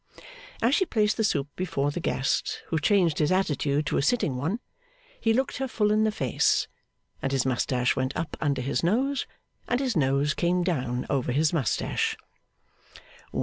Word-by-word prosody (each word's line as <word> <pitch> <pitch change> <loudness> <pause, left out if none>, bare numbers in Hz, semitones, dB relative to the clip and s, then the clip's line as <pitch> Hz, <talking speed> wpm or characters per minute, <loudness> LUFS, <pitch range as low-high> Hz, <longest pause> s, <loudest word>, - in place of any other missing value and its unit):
As 240 +4 +4
she 380 +4 +3
placed 215 -2 +2
the 220 - +1
soup 145 -9 +1
before 165 -6 -1
the 160 - -4
guest, 135 -5 -1
who 160 - +1
changed 175 -1 +2
his 150 +3 +2
attitude 150 -5 +1
to - - 0
a - - +2
sitting 160 - +1
one, 160 - -2 0.6
he 225 - +2
looked 260 +4 0
her 265 +1 -2
full 210 -4 +1
in 215 +1 +3
the 215 - +2
face, 135 - +1 0.5
and 135 - -1
his 135 -2 +1
moustache 125 -1 +1
went 130 0 -1
up 165 - -3
under 140 -4 0
his 135 - -1
nose, 265 +10 +1 0.4
and 245 - +1
his 260 -5 -1
nose 140 0 +2
came 175 +3 +1
down 130 -8 -1
over 130 -3 0
his 150 +5 +2
moustache. 145 -8 0
160 Hz, 175 wpm, -27 LUFS, 135-210 Hz, 0.6 s, As